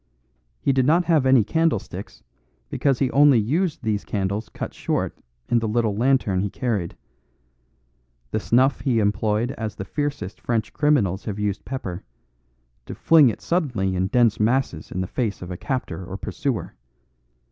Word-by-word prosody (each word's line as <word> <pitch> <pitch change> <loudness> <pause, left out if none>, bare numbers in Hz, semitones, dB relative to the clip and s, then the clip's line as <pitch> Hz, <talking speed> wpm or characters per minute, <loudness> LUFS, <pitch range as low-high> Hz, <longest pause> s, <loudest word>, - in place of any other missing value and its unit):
He 140 - +1
did 130 -1 +2
not 170 +3 +4
have 155 -6 +3
any 130 -4 +6
candlesticks 160 -1 -2 0.5
because 135 -3 +1
he 135 -1 0
only 145 -2 +6
used 150 - 0
these 105 -2 -1
candles 100 +2 -2
cut - - -6
short - - -2 0.3
in 120 - +3
the 115 - -2
little 110 -1 0
lantern 120 -5 +2
he 100 - -1
carried. 105 -7 -2 1.3
The - - 0
snuff 130 +5 +2
he 130 -5 0
employed 105 +2 +1
as 110 -2 -4
the 95 - -6
fiercest 145 -7 -4
French 115 -2 -1
criminals 115 - +1
have 105 -2 -4
used 105 -1 -2
pepper: 95 -9 -5 0.8
to - - -6
fling 155 -6 +6
it 110 - -5
suddenly 120 - 0
in 90 +1 0
dense 115 0 +3
masses 110 - 0
in 90 - -2
the - - -1
face 110 +1 -2
of 90 - -7
a - - -4
captor 110 - -3
or 95 +2 -6
pursuer. 135 - -3
115 Hz, 160 wpm, -23 LUFS, 100-135 Hz, 1.3 s, any